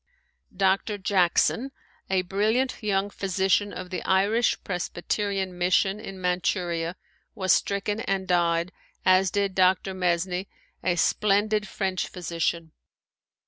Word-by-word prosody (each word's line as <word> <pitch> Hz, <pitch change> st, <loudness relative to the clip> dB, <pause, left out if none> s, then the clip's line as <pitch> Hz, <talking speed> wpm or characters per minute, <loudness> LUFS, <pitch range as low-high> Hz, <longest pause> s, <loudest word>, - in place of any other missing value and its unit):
Dr. 195 Hz, +2 st, +1 dB
Jackson, 195 Hz, +7 st, +2 dB, 0.4 s
a 190 Hz, -1 st, +2 dB
brilliant 215 Hz, +9 st, 0 dB
young 200 Hz, -1 st, 0 dB
physician 195 Hz, +1 st, +1 dB
of 185 Hz, 0 st, -8 dB
the 185 Hz, -, -3 dB
Irish 205 Hz, +5 st, +2 dB
Presbyterian 190 Hz, +1 st, -2 dB
Mission 185 Hz, +3 st, +2 dB
in 195 Hz, -3 st, -8 dB
Manchuria, 180 Hz, -2 st, -1 dB, 0.4 s
was 190 Hz, -3 st, +3 dB
stricken 200 Hz, +1 st, 0 dB
and 195 Hz, -3 st, -2 dB
died, 170 Hz, 0 st, +1 dB, 0.3 s
as 185 Hz, 0 st, +5 dB
did 200 Hz, +1 st, 0 dB
Dr. 190 Hz, +1 st, +2 dB
Mesny, 180 Hz, +1 st, -1 dB, 0.4 s
a 175 Hz, -, +1 dB
splendid 210 Hz, +4 st, +2 dB
French 190 Hz, -2 st, -2 dB
physician. 170 Hz, -2 st, -3 dB
190 Hz, 110 wpm, -26 LUFS, 180-200 Hz, 0.4 s, as